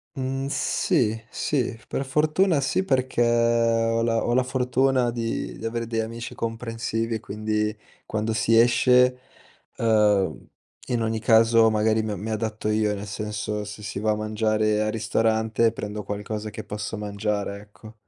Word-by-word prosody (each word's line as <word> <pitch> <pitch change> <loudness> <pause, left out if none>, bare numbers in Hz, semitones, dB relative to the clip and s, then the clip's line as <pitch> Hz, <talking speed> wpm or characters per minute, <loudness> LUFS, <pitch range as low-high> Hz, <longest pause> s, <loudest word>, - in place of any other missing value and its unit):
Mhmm, 135 +1 -2
sì, 110 -5 0
sì. 125 -5 -1
Per 135 - -2
fortuna 155 +4 +2
sì, 185 +7 0
perché 130 -6 0
ho 115 -1 +2
la 115 -1 +1
ho 120 - +1
la 130 - +4
fortuna 125 0 +1
di 115 -1 -3
di 115 - -8
avere 115 0 -2
degli 115 0 -2
amici 115 +1 -6
comprensivi, 115 0 -3
quindi 105 +1 -2 0.3
quando 110 +1 -1
si 115 +1 +3
esce, 125 +1 +4 0.6
uhm, 105 -4 +2 0.4
in 120 -2 0
ogni 110 0 -1
caso 115 0 +5
magari 110 +1 +2
mi 105 -3 -3
mi 110 +4 -5
adatto 110 0 -2
io, 105 -1 +1
nel 100 +1 -6
senso 105 0 -4
se 105 0 -9
si 100 - -4
va 110 0 +1
a - - +1
mangiare 110 0 0
al 110 0 0
ristorante 110 +1 +1
prendo 105 -1 -5
qualcosa 105 +2 -4
che - - -7
posso 105 +1 -5
mangiare, 100 -1 -3
ecco. 110 +1 -15
110 Hz, 155 wpm, -24 LUFS, 105-115 Hz, 0.6 s, caso